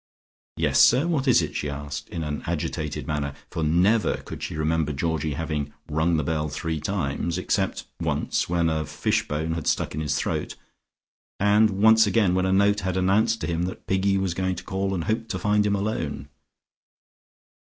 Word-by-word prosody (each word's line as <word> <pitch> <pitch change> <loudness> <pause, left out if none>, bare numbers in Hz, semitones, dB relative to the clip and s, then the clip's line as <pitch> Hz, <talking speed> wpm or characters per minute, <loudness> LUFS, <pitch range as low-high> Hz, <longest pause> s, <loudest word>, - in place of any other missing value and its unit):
"Yes, - - +3
sir, 130 +6 +6
what 155 -6 0
is 130 - +5
it?" - - -5
she 75 - -2
asked, 75 0 -6
in 85 -2 -4
an 75 -1 -3
agitated 75 -2 -3
manner, 75 -3 -2 0.2
for 80 - -3
never 90 +8 +3
could - - -9
she - - -4
remember 80 0 0
Georgie 80 0 -1
having 75 -2 -3 0.2
rung 80 +2 +2
the 75 - 0
bell 75 0 -1
three 80 +2 -3
times 85 -2 -2
except 95 +1 -1
once - - -1
when 85 -1 +2
a 80 -2 -1
fish 75 0 0
bone 80 +2 -2
had 80 -2 -4
stuck - - 0
in 75 - -3
his 75 -3 -1
throat, - - -2 0.8
and 105 +2 +4
once 110 +2 +5
again 100 -4 +3
when 95 0 +1
a - - +1
note 100 +2 +3
had 95 -1 -2
announced 110 +4 +2
to 75 - -2
him 85 0 -1
that 95 - -7
Piggy 95 +1 +1
was 95 -2 -1
going 95 +1 -1
to - - -8
call 95 0 -2
and 85 - -2
hoped 115 +3 -2
to 95 - -2
find 105 +2 +2
him 100 - +2
alone. 80 -9 -3
85 Hz, 190 wpm, -25 LUFS, 75-100 Hz, 0.8 s, sir